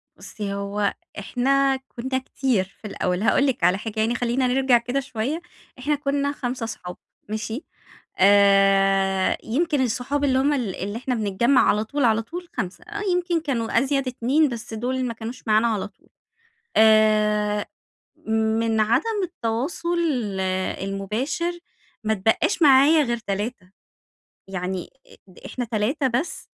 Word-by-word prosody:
بُصي 205 -2 -6
هو 200 +1 -1 0.3
إحنا 270 +6 +1
كنّا 260 0 -4
كتير 255 -5 0 0.2
في 215 - -6
الأول، 180 -2 -2
هاقول 265 +5 +3
لِك 250 -9 -1
على 180 +2 +4
حاجة 220 +1 -5
يعني 225 +2 +1
خلينا 245 +1 0
نرجع 260 0 +4
كده 245 +3 -2
شوية، 270 +4 -3 0.4
إحنا 295 +4 0
كنّا 280 0 -1
5 250 -3 -4
أصحاب، 180 -5 -6 0.3
ماشي، 220 +6 -4 0.6
آآ 195 -1 +4
يمكن 290 +4 0
الصحاب 260 +4 -1
اللي 265 -2 +3
هُم 285 +2 +2
ال 235 -9 -2
اللي 205 +4 -4
إحنا 255 +1 -2
بنتجمع 225 +5 +2
على 210 +1 +2
طول، 275 +4 -1
على 225 -1 +3
طول 350 +10 -8
5، 190 -6 -4 0.3
يمكن 350 -2 0
كانوا 235 -7 0
أزيد 275 +1 0
2 265 +5 +2
بس 235 -1 -7
دول 255 +3 -2
ما 235 - -3
كانوش 230 +2 -8
معانا 220 +2 +4
على 215 -4 -1
طول، 205 - -27 0.7
آآ 215 -1 +4 0.6
من 220 0 +1
عدم 305 - +1
التواصل 340 +3 -2 0.8
المباشر، 245 - -2 0.4
ما 220 0 +1
اتبقاش 225 - +1
معايا 290 +2 +6
غير 235 -3 -1
3، 205 -2 -4 0.8
يعني 185 -1 -4 0.2
إ - - -16
د 185 - -17
إحنا 245 - -4
3 235 +6 0
بس. 255 +7 -2
235 Hz, 140 wpm, -23 LUFS, 210-270 Hz, 0.8 s, معايا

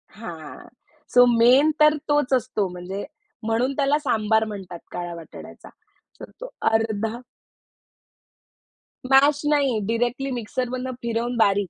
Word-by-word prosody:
हां, 160 - -10 0.5
so 245 0 +7
main 255 +6 +5
तर 305 0 +6
तोच 290 -2 +2
असतो 215 -5 0
म्हणजे 180 +3 -6 0.4
म्हणून 230 +5 0
त्याला 285 0 +2
सांबार 220 -5 +1
म्हणतात 195 -5 -8
काळा 175 -1 -5
वाटाण्याचा 165 -1 -12 0.5
तर - - -10
तो - - -6 0.2
अर्धा 220 0 -1 1.9
मॅश 285 +2 +5
नाही. 280 -6 +2
डायरेक्टली 245 +4 -1
मिक्सरमधून 255 +2 -3
फिरवून 235 +1 -2
बारीक. 200 -3 +2
230 Hz, 115 wpm, -23 LUFS, 205-265 Hz, 1.9 s, so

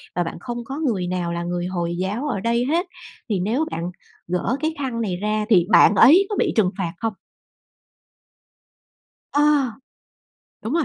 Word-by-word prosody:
và 175 - +1
bạn 165 - -6
không 240 +2 -5
có 275 +4 -6
người 210 - -1
nào 175 -1 -2
là 170 0 -3
người 175 0 -3
Hồi 175 -2 -2
giáo 210 +10 -2
ở 215 -8 -2
đây 235 +3 0
hết, 340 +6 0 0.4
thì 200 -4 0
nếu 235 - 0
bạn 170 +2 -4 0.4
gỡ 180 +9 -1
cái 315 +1 -1
khăn 245 -4 -2
này 185 -5 -2
ra 210 +2 -1
thì 180 -4 +4
bạn 210 - +6
ấy 350 - +7
có 415 - -2
bị - - +1
trừng 190 -4 +3
phạt 175 -3 -3
không? 225 -2 -2 2.2
Ờ. 290 - +2 1.2
Đúng 225 - -4
rồi. 335 -3 +2
210 Hz, 175 wpm, -22 LUFS, 180-260 Hz, 2.2 s, ấy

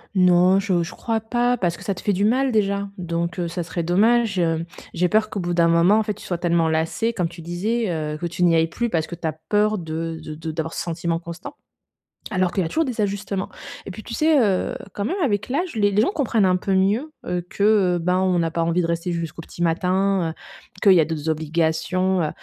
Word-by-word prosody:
Non, 180 +1 +5
je 185 -4 +1
je - - -6
crois 225 -1 -2
pas 240 +2 0
parce 175 -5 0
que - - -12
ça 200 - -2
te - - -9
fait 205 - +2
du 195 +2 0
mal 260 +5 +2
déjà, 200 -2 +1
donc 170 0 -3
heu, 175 - -1
ça 175 +1 -3
serait 170 +1 -4
dommage, 210 +4 +2
hem, 165 -2 +1 0.3
j'ai 180 +1 +1
peur 215 +2 +2
qu'au 205 - -3
bout 175 -1 -2
d'un 170 -1 +4
moment, 170 +5 +4
en 220 - +2
fait, 210 - -2
tu 205 - -13
sois 175 - -2
tellement 170 -2 +1
lassé 160 +9 0
comme 180 -6 0
tu 170 0 -11
disais, 205 +7 -1
heu, 155 -2 -3
que 175 - -2
tu 175 +1 -2
n'y 170 -2 +5
ailles 165 0 +3
plus 235 +7 -3
parce 160 -2 0
que 175 - -6
tu 170 - -9
as 155 - -1 0.2
peur 210 0 +2
de 165 0 -4
de 155 -1 -7
de 160 +1 -5
d'avoir 160 +1 -4
ce - - -2
sentiment 170 0 -2
constant. 170 - -8 0.8
Alors 185 -2 +1
qu'il 190 - 0
y - - 0
a 160 - -3
toujours 325 - +1
des 245 -4 -5
ajustements 200 -1 -2 0.4
et - - -6
puis 215 +4 -9
tu 230 - -8
sais, 310 +3 +3
heu, 200 -6 +1 0.2
quand 200 - -3
même 345 - -1
avec 205 -4 0
l'âge 330 +4 -2
les 205 -2 +3
les 205 +2 +3
gens 260 - +2
comprennent 230 - +1
un 185 0 +3
peu 195 +1 -2
mieux, 210 +11 +1
heu, 180 0 -1
que, 200 - -2
heu, 200 -4 +4
ben 180 +2 +1
on 185 -2 +2
n'a 165 -1 0
pas 165 0 -1
envie 170 +2 +1
de 165 - -1
rester 170 +1 -2
jusqu'au 165 0 -4
petit 170 - -10
matin, 185 +1 +1
heu, - - -9 0.5
qu'il 200 - +7
y 175 - +5
a 155 - +4
d'autres 160 -1 -3
obligations, 165 +4 0
heu 155 - 0
180 Hz, 255 wpm, -22 LUFS, 170-210 Hz, 0.8 s, qu'il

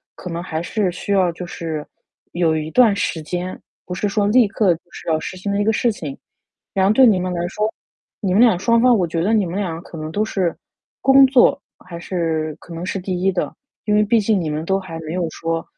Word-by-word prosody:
可 180 - -8
能 170 +1 -4
还 160 -3 -3
是 185 +1 -1
需 180 - -6
要 185 -3 +3
就 180 +1 -7
是 160 -3 -5 0.5
有 165 -2 +2
一 155 0 -3
段 230 -5 +5
时 170 -5 -2
间， 180 +3 -4 0.3
不 180 - -5
是 205 - -1
说 205 0 +1
立 235 0 +5
刻 200 -3 +2
就 165 - -17
是 - - -7
要 155 - +2
实 175 - -6
行 200 +2 -3
的 200 - 0
一 - - +2
个 220 - +2
事 235 +1 +2
情。 150 -9 -6 0.6
然 190 -1 +2
后 205 - +4
对 260 +3 +6
你 205 -5 +4
们 180 0 -2
来 175 0 -2
说， 210 +3 -1 0.5
你 190 -3 0
们 210 - +5
俩 230 -7 +5
双 230 +3 +3
方 250 0 +5
我 180 -3 +1
觉 165 0 -2
得 210 +5 +1
你 210 -3 +3
们 170 - -5
俩 165 -4 -3
可 170 - -11
能 155 0 -5
都 210 - 0
是 185 -6 -1 0.5
工 270 0 +7
作， 265 +1 +4 0.2
还 175 -2 -10
是 160 -4 -2
可 - - -15
能 165 +2 -5
是 195 - -3
第 180 -1 -3
1 195 +1 +3
的。 180 - -2 0.3
因 210 - +1
为 210 - +4
毕 225 +2 +3
竟 210 -1 +1
你 165 -3 -2
们 150 +1 -3
都 195 +2 +1
还 175 -4 -8
没 155 0 -6
有 175 -2 -1
说 165 +1 -3
185 Hz, 265 characters per minute, -20 LUFS, 165-210 Hz, 0.6 s, 工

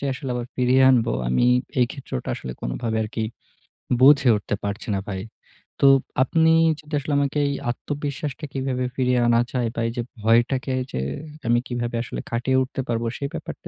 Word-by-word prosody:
যে - - -4
আসলে 130 0 -6
আবার 120 0 -3
ফিরিয়ে 130 +1 +4
আনবো, 120 - +3 0.2
আমি 65 - +2 0.3
এই 120 - +5
ক্ষেত্রটা 135 - -6
আসলে 65 - -6
কোনভাবে - - -2
আরকি 110 +1 -3 0.8
বুঝে 140 -1 +7
উঠতে 105 0 -3
পারছি 100 +4 -4
না 95 - -1
ভাই। 95 -1 -3 0.6
তো 140 - +7 0.4
আপনি 160 +4 +3 0.3
যেটা 150 0 -5
আসলে 145 +1 -3
আমাকেই 145 0 +1 0.2
আত্মবিশ্বাসটা 145 +2 -5
কীভাবে 130 -1 -2
ফিরিয়ে 125 -1 +2
আনা 115 0 +4
যায় 120 -2 0
বা 115 - -1
এইযে 120 +1 -3 0.2
ভয়টাকে 120 +4 +2
এইযে 125 - -4 0.5
আমি 120 +1 +4
কিভাবে 120 -1 -3
আসলে - - -6
কাটিয়ে 125 +3 +1
উঠতে 130 +1 -4
পারবো, 115 0 -1
সেই 140 - -3
ব্যাপারটা - - -7
125 Hz, 165 wpm, -23 LUFS, 115-135 Hz, 0.8 s, বুঝে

